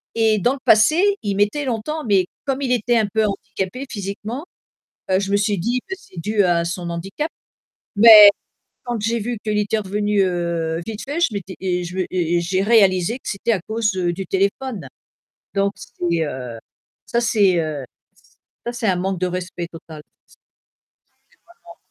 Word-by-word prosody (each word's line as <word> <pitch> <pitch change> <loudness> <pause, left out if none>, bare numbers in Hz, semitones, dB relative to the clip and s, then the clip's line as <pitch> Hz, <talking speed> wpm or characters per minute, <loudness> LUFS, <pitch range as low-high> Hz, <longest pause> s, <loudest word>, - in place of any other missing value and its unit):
Et 220 -2 +3
dans 245 +6 +2
le 275 - -7
passé, 305 - +5 0.2
il 200 -2 -2
mettait 205 +9 +1
longtemps, 260 +6 -3
mais 195 -4 +3 0.2
comme 270 0 -1
il 260 -3 -1
était 240 0 +2
un 220 - +3
peu 220 +2 0
handicapé 205 +4 -4
physiquement, 215 - -5 0.7
heu, 185 - +4
je 200 0 -3
me 200 - +4
suis 205 0 0
dit 240 +7 0
que 385 - -4
c'est 185 - -12
dû 210 +3 +1
à 170 -2 +2
son 175 0 -4
handicap. 195 - -4 0.7
Mais 215 -1 +10 0.6
quand 240 -2 -3
j'ai 225 +3 0
vu 235 +2 -3
qu'il 210 -1 0
était 210 +1 0
revenu, 205 0 0
heu, 170 -3 -1
vite 220 -1 -6
fait, 295 +5 -3
je - - +4
m'étais 195 -2 -6
et 180 -1 -1
je 180 +2 -6
et 175 -1 0
j'ai 185 +2 0
réalisé 200 -1 +3
que - - -10
c'était 210 +4 -1
à 190 - 0
cause, 220 +1 -1
heu, 175 -2 0
du 190 +2 -6
téléphone. 200 - -1 0.7
Donc, 200 0 +1
c'est, 170 -2 -2
heu, 125 -5 -6 0.5
ça 235 - 0
c'est, 205 -6 +3
heu, 150 -4 -4 0.3
ç - - -32 0.5
ça 240 - -2
c'est 240 -1 -3
un 185 - +2
manque 185 0 -2
de 185 - +1
respect 180 -1 -4
total. 160 -2 -11
C - - -56
c'est - - -56 1.4
vraiment - - -14
200 Hz, 185 wpm, -21 LUFS, 180-225 Hz, 1.4 s, Mais